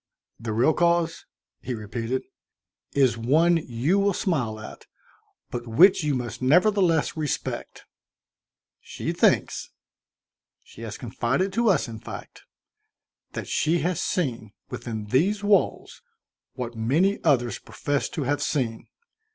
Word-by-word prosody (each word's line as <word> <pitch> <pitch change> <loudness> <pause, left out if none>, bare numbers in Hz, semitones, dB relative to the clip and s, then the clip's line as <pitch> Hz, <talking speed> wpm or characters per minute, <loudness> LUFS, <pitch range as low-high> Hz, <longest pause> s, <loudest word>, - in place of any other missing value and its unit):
"The 115 0 -4
real 120 +8 +3
cause 170 -1 +1 0.2
" - - -68
he 125 - -4
repeated. 115 +4 -3 0.4
" - - -36
is 120 -3 +2
one 160 +9 +4
you 150 +6 0
will 200 0 +2
smile 125 - -1
at, 110 - -10 0.6
but 120 -1 -5
which 170 - +6
you 150 -2 +1
must 120 -1 -4
nevertheless 175 +3 +3
respect. 155 -3 -4 0.9
She - - -5
thinks - - +2 0.9
she - - -14
has 110 -3 -6
confided 130 - -1
to 235 +1 +2
us, 175 -10 +2
in 115 -1 -7
fact - - -10 0.9
that - - -5
she 165 +2 +1
has 180 -1 0
seen, 115 - -2 0.2
within 110 -3 -5
these 185 - +1
walls, 205 -1 +1 0.5
what 125 -2 -5
many 155 - +1
others 125 -7 +2
profess 145 -1 -2
to 155 - -3
have 145 +2 0
seen. 120 -6 -1
140 Hz, 130 wpm, -25 LUFS, 115-175 Hz, 0.9 s, which